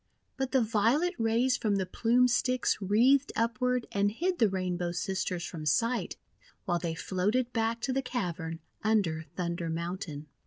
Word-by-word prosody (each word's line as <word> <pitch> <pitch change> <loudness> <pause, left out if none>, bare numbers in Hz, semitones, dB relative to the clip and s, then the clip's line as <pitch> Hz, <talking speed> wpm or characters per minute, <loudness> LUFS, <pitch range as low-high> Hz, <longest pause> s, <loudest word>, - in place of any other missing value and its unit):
But 265 -1 -2
the 265 -3 +3
violet 230 - +2
rays 235 +3 +2
from 210 -4 0
the 190 -1 0
Plume 235 +6 +3
Sticks 250 +1 +1
wreathed 245 +8 +4
upward 235 +2 0
and 200 0 +1
hid 355 - -1
the 225 -4 +5
Rainbow 180 -2 -2
Sisters 180 -1 -2
from 160 -3 -6
sight, 230 - +1 0.5
while 175 -1 +1
they 165 -1 -3
floated 210 +8 0
back 225 0 0
to 260 - -1
the 270 - +1
cavern 175 -10 -4 0.2
under 190 -8 +1
Thunder 170 -1 -2
Mountain. 165 -2 -4
215 Hz, 155 wpm, -30 LUFS, 180-250 Hz, 0.5 s, the